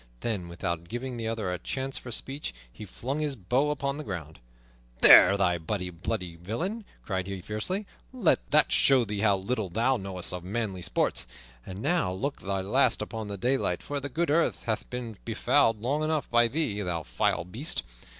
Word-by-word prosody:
Then, 105 -7 -2
without 85 0 -4
giving 125 +3 -4
the 115 -1 -3
other 110 -5 -2
a 90 - -4
chance 135 0 -4
for 120 - -5
speech, 135 - -4 0.2
he 105 - -9
flung 130 +9 -4
his 150 -3 -1
bow 125 +8 +1
upon 140 -1 -1
the 150 - -5
ground. 80 - -6 0.6
"There, 100 - +9
thou 90 -3 +2
bloody 90 +2 -3 0.5
villain!" 170 - -3 0.2
cried 95 -2 -2
he 95 -1 -4
fiercely, 110 - -2 0.3
"let 245 -10 +1
that 150 0 +4
show 130 -3 +5
thee 105 -1 -3
how 100 -2 +3
little 105 0 -2
thou 120 +8 +2
knowest 95 -4 -5
of 90 -1 -5
manly 100 -1 -3
sports. 80 - 0 0.4
And 95 +2 -7
now 165 - +2
look 135 +10 -3
thy 95 0 -1
last 115 +3 +2
upon 110 0 -5
the 100 -1 -5
daylight, 125 +6 0
for 145 0 -3
the 140 +1 -5
good 165 +4 0
earth 165 +2 +2
hath 110 -2 -2
been 120 -3 -6
befouled 110 - +2
long 140 +5 0
enough 155 -1 0
by 120 0 +5
thee, 115 -6 0
thou 85 -4 -2
vile - - 0
beast! 115 - -2
115 Hz, 185 wpm, -28 LUFS, 95-135 Hz, 0.6 s, There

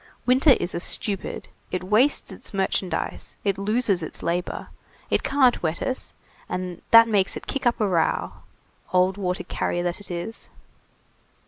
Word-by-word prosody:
Winter 260 +3 +6
is 175 - -1
a - - -2
stupid; 195 +2 0 0.2
it 185 - -3
wastes 215 +7 +2
its 190 - -9
merchandise, 190 -2 -2
it 200 -2 0
loses 210 -2 +2
its 160 - -7
labor, 175 +1 -2 0.4
it - - +2
can't 265 -3 +3
wet 160 -1 -1
us, 260 - -3 0.4
and 180 -1 -4
that 230 0 +8
makes 200 -4 +1
it - - -9
kick 275 -3 -1
up 240 - +1
a 210 - +2
row, 170 -4 +1 0.6
old 185 +1 +3
water 180 -2 -2
carrier 175 - -2
that 175 +1 -1
it 205 - -13
is." 175 +6 -6
195 Hz, 155 wpm, -24 LUFS, 180-230 Hz, 0.6 s, that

